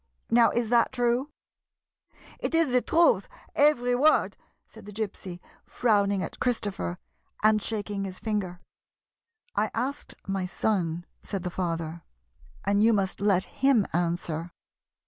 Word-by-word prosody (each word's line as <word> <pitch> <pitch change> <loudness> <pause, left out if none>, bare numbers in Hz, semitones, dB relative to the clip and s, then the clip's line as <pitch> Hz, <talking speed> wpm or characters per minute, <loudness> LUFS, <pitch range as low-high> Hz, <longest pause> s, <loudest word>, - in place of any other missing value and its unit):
Now, 230 -1 +6
is 235 0 -1
that 235 -1 +3
true? 245 +2 0 0.4
" - - -65
" - - -24
It - - -1
is 325 -5 +3
the 250 0 +4
truth, 340 - +3 0.2
every 280 -4 +3
word," 300 +5 +3 0.3
said - - -15
the - - -7
Gypsy, 195 -4 -5 0.2
frowning 200 -4 +1
at - - -7
Christopher, 205 -7 -1 0.5
and 215 0 +4
shaking 205 -2 -3
his 185 -1 -6
finger. 195 -5 -3 0.5
" 465 -1 -63
I 210 +1 +1
asked 265 +5 -3
my 195 -1 -2
son," 175 -4 -1 0.2
said 195 -3 -5
the 180 - -3
father, 165 -2 -3 0.3
" 70 +1 -26
and 200 +1 +2
you 225 +1 +5
must 195 -2 0
let 195 -3 +3
him 265 -7 +2
answer." 170 -1 -1
205 Hz, 145 wpm, -27 LUFS, 180-245 Hz, 0.5 s, Now